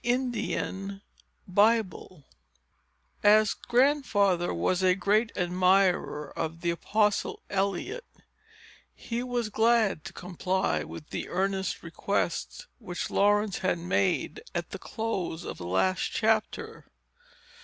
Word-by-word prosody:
Chapter 245 +1 +1 1.2
VIII 200 -4 +1 1.0
As 215 0 +5
Grandfather 235 - +2
was 90 - 0
a 185 -1 +4
great 210 +4 +2
admirer 180 -3 +2
of 165 +1 -4
the 170 - +1
Apostle 210 +4 0
Eliot, 200 - -2 0.9
he 235 0 -4
was 245 -3 -2
glad 220 -6 +2
to 175 - -6
comply 180 +2 -1
with 155 - -10
the - - -4
earnest 190 +1 -1
request - - -2
which 180 -7 -5
Laurence 205 0 +2
had 185 - 0
made, 180 - 0
at - - -3
the - - -6
close 190 -7 -3
of - - -7
the 85 - -6
last 185 - +1
chapter. 220 0 -1
195 Hz, 110 wpm, -28 LUFS, 180-220 Hz, 1.2 s, As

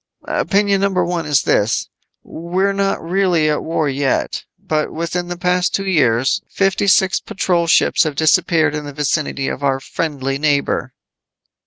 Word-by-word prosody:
"Opinion 200 -1 +1
number 190 -3 +1
one 170 -3 -3
is 145 -2 +2
this: 105 +2 +1 0.4
We're 185 +4 -2
not 195 0 0
really 180 -4 +2
at 150 - -2
war 160 -2 -1
yet, 140 0 -1
but 155 -1 -2
within 170 +2 -3
the 175 0 -5
past 180 +1 +1
two 195 - -2
years, 130 -9 +2
fifty 195 +1 0
six 190 0 +3
patrol 175 -3 -1
ships - - +3
have 155 -3 0
disappeared 160 -1 +2
in 150 -1 -4
the 145 - -8
vicinity 145 -1 -1
of 140 - -4
our 135 -1 +1
friendly 135 -1 -3
neighbor." 145 -2 0
165 Hz, 155 wpm, -18 LUFS, 145-185 Hz, 0.4 s, six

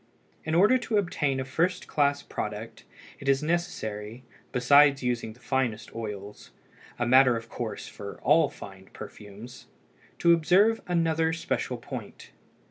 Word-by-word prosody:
In 160 - -1
order 210 +9 +5
to 230 -3 -1
obtain 150 -8 0
a 130 - -3
first 170 +7 -1
class 145 -1 +1
product, - - -6 0.3
it 140 - -3
is 135 +1 +2
necessary, 120 - -3 0.3
besides 140 +2 +5
using 120 -3 -2
the 120 - -22
finest 125 -4 -2
oils—a 105 +2 -8
matter 125 0 +5
of 115 0 -9
course 110 -4 -5
for 100 -1 -9
all 150 +1 +4
fine 95 -1 -12
perfumes—to 120 - -4
observe 190 +7 +3
another 165 -2 +1
special 165 - -3
point. - - -9
135 Hz, 130 wpm, -27 LUFS, 115-165 Hz, 0.3 s, order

